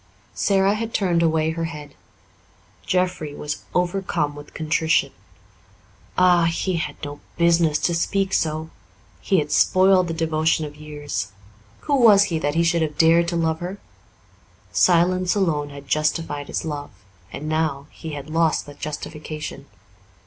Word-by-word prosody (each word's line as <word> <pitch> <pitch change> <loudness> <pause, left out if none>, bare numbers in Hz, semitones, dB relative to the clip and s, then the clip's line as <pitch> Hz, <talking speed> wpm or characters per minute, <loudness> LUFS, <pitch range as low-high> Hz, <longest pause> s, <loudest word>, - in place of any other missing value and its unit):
Sara 195 - +2
had 225 +1 -4
turned 175 -4 +2
away 160 -1 +2
her 165 0 -3
head. 150 -3 -8 0.9
Jeffrey 180 -5 -1
was 150 0 -5
overcome 180 -4 0
with 145 0 -12
contrition. 160 +1 +1 1.1
Ah, 180 -2 +5
he 170 +2 0
had 150 -3 -3
no 145 0 -7 0.2
business 170 -2 +3
to 175 - +1
speak 195 +3 0
so 155 0 -1 0.5
he 190 - +1
had 150 -2 -1
spoiled 185 -1 +4
the 165 - -3
devotion 160 -1 +1
of 145 0 -9
years. 145 -9 -5 0.5
Who 290 - 0
was 215 -5 +7
he 160 - +1
that 145 -1 -1
he 170 - +3
should 170 0 +2
have 150 -2 -2
dared 165 +1 +5
to 170 - -2
love 160 -1 0
her? 180 +3 -5 0.9
Silence 180 +1 +3
alone 155 -7 0
had 140 -1 -11
justified 155 -1 -1
his - - -3
love, 145 -2 -4 0.4
and 150 - -6
now 155 -3 -1
he 160 -1 -8
had 140 -1 -6
lost 160 0 +1
that 145 -1 -13
justification. 150 -1 -6
160 Hz, 150 wpm, -22 LUFS, 150-175 Hz, 1.1 s, was